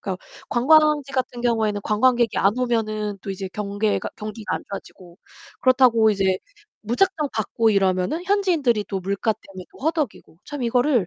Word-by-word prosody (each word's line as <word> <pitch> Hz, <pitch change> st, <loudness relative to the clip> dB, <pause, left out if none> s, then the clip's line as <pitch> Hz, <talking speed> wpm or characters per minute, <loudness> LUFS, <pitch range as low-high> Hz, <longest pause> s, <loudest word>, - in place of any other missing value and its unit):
그러니까 190 Hz, -2 st, -3 dB, 0.3 s
관광지 295 Hz, +2 st, +3 dB
같은 250 Hz, -2 st, -2 dB
경우에는 220 Hz, -4 st, 0 dB
관광객이 235 Hz, +1 st, +2 dB
안 205 Hz, +5 st, +2 dB
오면은 215 Hz, -4 st, -1 dB
또 200 Hz, -, -5 dB
이제 190 Hz, 0 st, -5 dB
경계가 205 Hz, 0 st, -1 dB
경기가 215 Hz, 0 st, -5 dB
안 -, -, -10 dB
좋아지고. 185 Hz, -3 st, -10 dB, 0.4 s
그렇다고 250 Hz, -4 st, +5 dB
이제 190 Hz, -2 st, +1 dB, 0.4 s
무작정 300 Hz, -, 0 dB
받고 225 Hz, +1 st, +1 dB
이러면은 195 Hz, -, +1 dB
현지인들이 335 Hz, -, +1 dB
또 195 Hz, -, -2 dB
물가 200 Hz, +4 st, -1 dB
때문에 190 Hz, -3 st, -12 dB
또 -, -, -18 dB
허덕이고. 305 Hz, -, -2 dB
참 290 Hz, -3 st, -6 dB
이거를 245 Hz, -, +2 dB
225 Hz, 380 characters per minute, -23 LUFS, 200-260 Hz, 0.4 s, 그렇다고